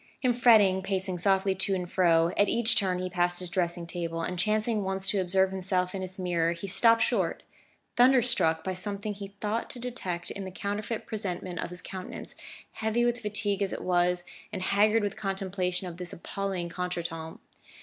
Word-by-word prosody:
In 250 - +4
his 240 - -10
fretting, 205 -6 +6
pacing 190 -1 -2
softly 195 +1 +3
to 190 +1 +1
and 180 -1 -3
fro, 170 -2 +3
at 205 - +3
each 230 -1 +3
turn 185 -3 +1
he 185 0 -2
passed 175 -1 +1
his 180 -2 -5
dressing 175 -2 -1
table, 170 -1 -4
and 180 +1 -3
chancing 215 +2 +1
once 190 0 -2
to 200 - +1
observe 190 +1 +2
himself 185 -1 0
in 195 - -4
its 185 0 -6
mirror, 170 -2 +1
he 170 +3 -7
stopped 230 +4 +4
short, 200 -8 0 0.5
thunderstruck 245 -10 +4
by 190 - -2
something 205 +2 -3
he 200 0 -9
thought 215 +2 -2
to 245 - -7
detect 190 -8 -4
in 200 - -5
the 190 - -5
counterfeit 205 +4 -4
presentment 185 -4 -3
of - - -3
his 180 0 -6
countenance, 185 -1 -7 0.4
heavy 225 +2 0
with 240 0 0
fatigue 205 -1 0
as 195 - 0
it - - -5
was, 180 0 +2 0.3
and 190 -3 -4
haggard 210 +3 +3
with 205 - -2
contemplation 190 -2 -1
of 170 -1 -7
this 180 -1 -4
appalling 190 0 -3
contretemps. 170 -2 -4
190 Hz, 190 wpm, -28 LUFS, 180-205 Hz, 0.5 s, fretting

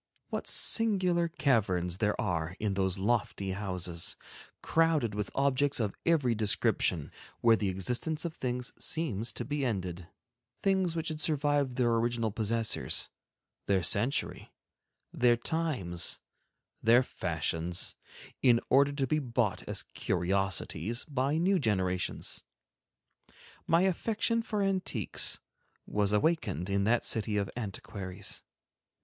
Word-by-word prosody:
What - - -4
singular 185 -6 +3
caverns 95 - +1
there 105 -2 0
are 85 0 -1
in 105 -2 0
those 95 -1 0
lofty 100 -2 0
houses, 90 -3 -2 0.5
crowded 160 -9 +2
with 105 0 -3
objects 140 0 +2
of 105 -4 -1
every 145 -8 +3
description, 100 -7 +1 0.3
where 115 -1 +6
the 105 -3 -1
existence 125 - -1
of 165 - -3
things 125 -2 -3
seems 120 -9 -1
to - - -4
be 145 0 -2
ended, 90 -7 -3 0.6
things 190 -4 +2
which 165 0 -2
have 155 -1 -4
survived 145 -4 +1
their 120 -2 +2
original 115 -1 0
possessors, 115 +1 0 0.6
their 95 -3 +2
century, 120 +7 0 0.6
their 120 -1 +4
times, 120 - 0 0.6
their 120 +3 +5
fashions, 85 -3 -2 0.5
in 120 -3 +5
order 140 +2 +5
to 140 -1 0
be 155 +4 +1
bought 120 -8 0
as - - -2
curiosities 95 +5 -1
by 140 +1 0
new 185 +3 +3
generations. 95 -6 -1 1.2
My 165 +1 +4
affection 225 +5 +1
for 210 -2 -2
antiques 185 - 0 0.5
was 105 -1 0
awakened 105 - 0
in 100 0 +1
that 115 +2 +2
city 105 -1 0
of 100 -1 -1
antiquaries. 100 -3 -5
115 Hz, 120 wpm, -30 LUFS, 100-150 Hz, 1.2 s, where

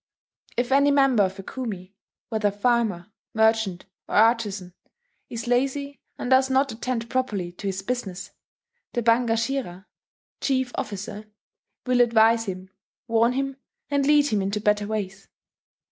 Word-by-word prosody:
"If 245 +1 0
any 280 +1 +5
member 270 -5 +4
of 190 0 0
a 195 - -8
kumi, 195 -6 -6 0.4
whether 220 -2 +1
farmer, 205 -3 0 0.2
merchant, 220 -4 +2 0.2
or - - -4
artizan, 210 -5 +2 0.6
is 230 -1 -5
lazy, 275 +2 -1 0.2
and 250 - -4
does 260 0 +5
not 265 +1 +2
attend 235 0 -3
properly 215 -9 -2
to 190 +3 -7
his 190 0 -3
business, 195 -5 -4 0.6
the 240 - -1
ban 235 +1 +3
gashira 225 -5 -2 0.5
[chief 260 -2 0
officer] 210 +1 -5 0.6
will 250 -1 +3
advise 230 -1 +4
him, 190 -1 -6 0.4
warn 230 +1 +3
him, 275 +1 -2 0.3
and 280 -1 +2
lead 295 -1 +5
him 210 -2 +1
into 200 +2 -1
better 210 0 +1
ways. 200 -2 -4
225 Hz, 140 wpm, -25 LUFS, 200-255 Hz, 0.6 s, any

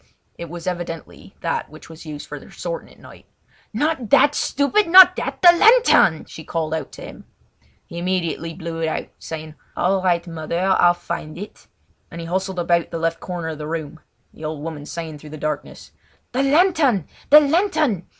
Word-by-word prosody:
It 170 -1 -8
was 170 0 -8
evidently 175 -3 -6
that - - -2
which - - -14
was 160 0 -12
used 150 -1 -7
for - - -8
their - - -16
sorting - - -6
at - - -19
night. - - -16 0.4
"Not 260 -1 -1
that, 290 +7 +5
stupid! 295 +9 +1
Not 365 +1 +9
that! - - -4
the 350 - +10
lantern!" 430 - +5
she 160 - -11
called 160 0 -3
out 160 -4 -4
to - - -10
him. - - -11 0.6
He 170 - -8
immediately 170 -2 -2
blew 165 -2 -6
it 160 - 0
out, 160 - -3
saying: 155 -1 -7 0.2
"All 190 +1 +1
right, 175 -2 +1
mother 165 -1 -5
I'll 180 -2 +4
find 155 -2 -6
it," 205 +3 -10 0.4
and 170 - -9
he 165 - -6
hustled 190 +2 -3
about 170 -1 +1
the 170 - -4
left 165 0 -1
corner 175 -3 -5
of 155 -1 -7
the 150 - -5
room—the 160 0 -9
old 155 -1 -5
woman 155 -2 -7
saying 160 -3 -6
through 150 - -12
the 155 - -8
darkness: 150 0 -5 0.4
"The 255 - 0
lantern! 280 - +3 0.2
the 300 - +10
lantern! 300 - +1
170 Hz, 185 wpm, -21 LUFS, 160-250 Hz, 0.6 s, the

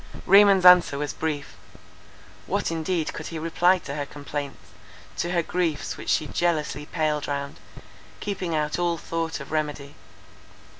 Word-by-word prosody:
Raymond's 195 -1 +6
answer 180 -5 +7
was 145 0 -3
brief. 150 -3 -4 0.9
What - - -1
indeed 165 0 -2
could - - -6
he 165 - -6
reply 170 +3 +3
to 150 -5 -7
her 145 0 -3
complaints, 145 -1 -7 0.5
to 175 - -1
her 175 -1 +1
griefs 165 -4 -2
which - - -7
she 155 - +2
jealously 150 -2 -1
paled 155 -3 -1
round, 140 0 -4 0.6
keeping 185 -5 -3
out 150 +2 -1
all 175 -1 +1
thought 165 0 -3
of 140 - -10
remedy. 150 -2 -3
160 Hz, 145 wpm, -25 LUFS, 145-175 Hz, 0.9 s, answer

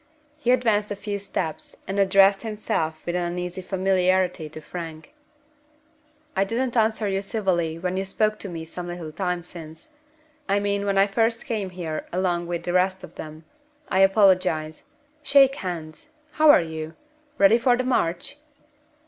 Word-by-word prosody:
He 245 - -2
advanced 220 -5 +2
a 205 - -3
few 205 0 -4
steps, 180 -5 -4
and 195 +1 -2
addressed 195 0 +5
himself 210 -8 -2
with 175 - -2
an 180 - 0
uneasy 180 +1 -4
familiarity 185 -3 +1
to 155 - -9
Frank. 160 - -8 1.2
"I 195 - +3
didn't 240 +5 -2
answer 220 -1 +2
you 195 0 0
civilly 185 -6 -1
when 180 +2 -2
you 190 - 0
spoke 215 +2 0
to 200 - -6
me 165 -2 -6
some 175 +2 -7
little 175 -3 -6
time 180 0 -2
since. 170 - -11 0.6
I 200 +1 +3
mean 200 0 -1
when 195 -1 +1
I 195 - +6
first 225 +3 0
came 215 -4 -2
in 180 - -17
here 160 -4 -4
along 175 -1 0
with 170 -1 -3
the 175 - -2
rest 185 +1 +1
of 165 - -10
them. 155 0 -9 0.4
I 190 - +1
apologize. 185 - +3 0.4
Shake 275 -2 +5
hands! 165 - -6 0.2
How 310 0 +4
are 290 - +7
you? 160 0 -6 0.4
Ready 205 +4 +6
for 245 +1 +3
the 255 - 0
march?" 250 +1 -1
190 Hz, 165 wpm, -24 LUFS, 170-205 Hz, 1.2 s, are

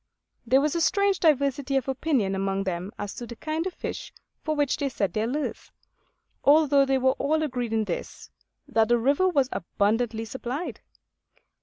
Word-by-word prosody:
There 265 +3 +5
was 300 0 +1
a 340 - 0
strange 400 +2 +2
diversity 280 -3 +2
of 265 - -2
opinion 265 -7 0
among 195 0 -1
them 185 +1 -3
as 205 -1 -5
to 240 - -7
the 235 - -8
kind 315 +6 -3
of 370 - -5
fish - - -6 0.3
for 310 -1 -1
which 290 -2 +1
they 280 - -1
set 200 -6 -2
their 220 +1 0
lures; 290 +4 -4 0.7
although 285 -2 +5
they 270 0 +3
were 260 0 +3
all 310 +2 +1
agreed 245 -5 -2
in 220 -1 +1
this, - - -6 0.4
that 225 -1 +2
the 240 - +4
river 280 +10 +2
was 275 -7 +2
abundantly 220 +5 0
supplied. 260 +7 -5
265 Hz, 175 wpm, -26 LUFS, 225-300 Hz, 0.7 s, There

